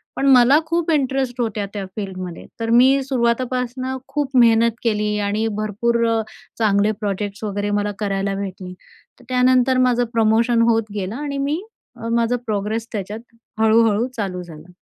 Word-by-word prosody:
पण 275 - -1
मला 260 +4 +6
खूप 335 0 0
इंटरेस्ट 265 -3 0
होता 215 -3 -2
त्या 200 -2 -4
फील्डमध्ये. 185 -4 -6
तर 225 0 -2
मी 260 +4 +5
सुरुवातीपासनं 255 0 -1
खूप 280 -3 -3
मेहनत 230 -1 +5
केली 210 -2 0
आणि 215 +2 0
भरपूर 235 +3 0
अ, 225 -1 +1 0.4
चांगले 210 -1 +3
प्रोजेक्ट्स 205 +1 -3
वगैरे 205 0 -2
मला 205 0 -1
करायला 195 -1 -1
भेटली. 185 -2 -6 0.5
तर - - -18
त्यानंतर 255 0 +3
माझं 245 -1 +3
प्रमोशन 230 +1 +3
होत 225 -1 +2
गेलं 200 +2 -3
आणि 285 0 -4
मी 290 +5 -1 0.3
अ, 230 - -7
माझा 235 +1 +1
प्रोग्रेस 215 +2 -2
त्याच्यात 210 +2 -4 0.4
हळू-हळू 220 +1 +3
चालू 185 -4 -3
झालं. 165 +1 -13
225 Hz, 150 wpm, -20 LUFS, 205-250 Hz, 0.5 s, मला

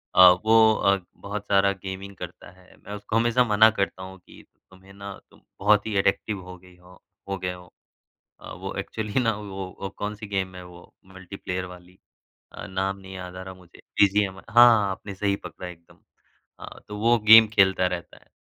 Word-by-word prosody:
अ, 90 -1 +9 0.2
वो 110 0 +6
अ, 100 -2 +2 0.2
बहुत 100 +1 -6
सारा 100 0 +3
गेमिंग 95 +1 -7
करता - - -10
है, 95 0 -21
मैं 100 - -11
उसको 105 +2 -5
हमेशा 120 +2 +3
मना 110 -1 +5
करता 95 -1 -2
हूँ 95 0 -10
कि - - -16 0.3
तुम्हें 95 +1 -17
ना 100 0 -8 0.2
तुम - - -23 0.2
बहुत 105 +1 +3
ही 105 - -3
एडिक्टिव 100 +1 0
हो 90 0 -11
गई 90 0 -19
हो 90 0 -19 0.3
हो 95 - -2
गए 90 0 -4
हो। 90 -1 -14 0.7
अ, - - -11
वो - - -7
एक्चुअली 110 +3 -3
ना 115 -2 +1
वो 95 -2 -7
अ, 100 - -7
कौन 105 +1 -4
सी 105 0 -9
गेम 95 -2 -3
है 90 - -9
वो 90 -1 -15
मल्टीप्लेयर 95 -1 -7
वाली? 90 0 -14 0.5
अ, - - -9
नाम 95 +1 -2
नहीं 95 0 -11
याद 90 -1 -8
आ 95 - -7
रहा 95 0 -9
मुझे 90 -2 -19 0.2
बीजीएम 100 -1 +3
हाँ, 115 -3 +6
आपने 100 +1 -7
सही 100 0 -1
पकड़ा 90 - -8
है 90 - -7
एकदम 85 0 -21 0.6
अ, - - -10
तो 105 - -7
वो 115 +2 +3
गेम 110 0 +10
खेलता 95 -3 +3
रहता 90 -1 -5
है। - - -26
95 Hz, 200 wpm, -24 LUFS, 95-105 Hz, 0.7 s, गेम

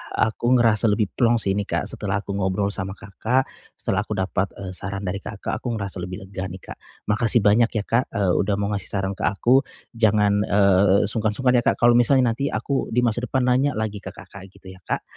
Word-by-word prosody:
aku 120 +3 +1
ngerasa 115 -2 +3
lebih 105 -1 +1
plong 120 -1 +3
sih 100 - 0
ini, 100 - 0
Kak, - - 0
setelah 95 -2 -2
aku - - -6
ngobrol 95 +1 0
sama 95 +1 -4
Kakak, 115 +5 -1 0.3
setelah - - -1
aku - - -14
dapat, 95 0 -1
eee, 95 -2 -6
saran 100 +1 -5
dari 100 +2 -2
Kakak, 105 -2 -5
aku - - -6
ngerasa 100 -2 -5
lebih 90 +2 -7
lega 95 -1 -5
nih, 95 +1 -9
Kak. - - -8 0.3
Makasih 115 +2 +2
banyak 115 +3 +4
ya 110 -2 -2
Kak, 115 +2 +2
eee, 100 -3 +1
udah 100 0 +1
mau 100 +1 -1
ngasih 100 -2 -3
saran 95 -1 -1
ke - - -11
aku. 120 - +3 0.3
Jangan, 105 -2 +3
eee, 100 -1 +4
sungkan-sungkan 115 +3 +1
ya - - -3
Kak - - +2
kalau 120 0 +5
misalnya 120 0 +4
nanti 140 +2 -2
aku 140 -1 -2
di 125 - +1
masa 120 0 0
depan 130 +1 0
nanya 130 +3 +2
lagi 110 -2 -3
ke - - -6
Kakak, 100 -1 -12
gitu 95 -1 -13
ya 95 - -16
Kak. - - -3
105 Hz, 220 wpm, -23 LUFS, 100-120 Hz, 0.3 s, kalau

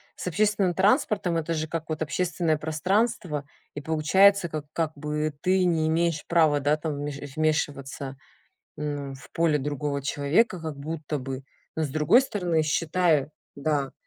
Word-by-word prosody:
с - - -6
общественным 200 0 +1
транспортом. 205 - +2
Это 165 +1 -1
же 155 0 -2
как 165 0 -5
вот 155 0 -1
общественное 165 +1 0
пространство 160 0 0 0.3
и 145 - -6
получается 170 +5 +4
как 155 -2 -5
как 160 -2 0
бы 150 +1 -2
ты 185 0 +3
не 160 -3 +2
имеешь 165 -1 +1
права, 160 -4 +4
да, 145 +2 +2
там 155 0 -3
вмеш 145 0 -4
э, - - -7
вмешиваться, 140 -3 -1 0.6
м, 145 -2 -4
в 135 - -14
поле 165 -3 +2
другого 145 0 -2
человека, 155 - +1
как 160 -3 -5
будто 150 0 -4
бы. 130 0 -6 0.3
Но 160 - +1
с - - -2
другой 155 - +4
стороны, 180 -11 0
считай, 155 -1 +2 0.3
да. 140 -1 -1
155 Hz, 160 wpm, -26 LUFS, 145-170 Hz, 0.6 s, получается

